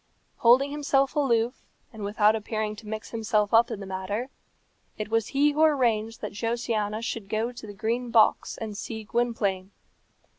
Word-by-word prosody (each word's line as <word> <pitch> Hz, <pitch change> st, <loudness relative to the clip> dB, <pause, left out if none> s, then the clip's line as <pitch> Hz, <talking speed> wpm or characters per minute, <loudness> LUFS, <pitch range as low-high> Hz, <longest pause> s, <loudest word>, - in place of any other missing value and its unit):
Holding 255 Hz, +4 st, +5 dB
himself 280 Hz, -1 st, +1 dB
aloof, 245 Hz, -4 st, +1 dB, 0.3 s
and 220 Hz, -2 st, -8 dB
without 210 Hz, +1 st, +3 dB
appearing 215 Hz, 0 st, -3 dB
to 215 Hz, -, -11 dB
mix 215 Hz, 0 st, -6 dB
himself 220 Hz, -2 st, 0 dB
up 230 Hz, +1 st, +6 dB
in -, -, -5 dB
the 200 Hz, -, -7 dB
matter, 190 Hz, +6 st, -4 dB, 0.7 s
it 215 Hz, 0 st, -4 dB
was 225 Hz, -1 st, +1 dB
he 290 Hz, +2 st, +3 dB
who 300 Hz, +2 st, -1 dB
arranged 230 Hz, -7 st, +2 dB
that 210 Hz, -, -4 dB
Josiana 225 Hz, -1 st, -2 dB
should 225 Hz, -4 st, -4 dB
go 225 Hz, +3 st, -1 dB
to 240 Hz, -3 st, -10 dB
the 205 Hz, -, -8 dB
Green 235 Hz, +4 st, -2 dB
Box 225 Hz, -2 st, +3 dB
and 220 Hz, -2 st, -5 dB
see 220 Hz, +2 st, -6 dB
Gwynplaine. 205 Hz, -5 st, -1 dB
225 Hz, 170 wpm, -26 LUFS, 210-240 Hz, 0.7 s, up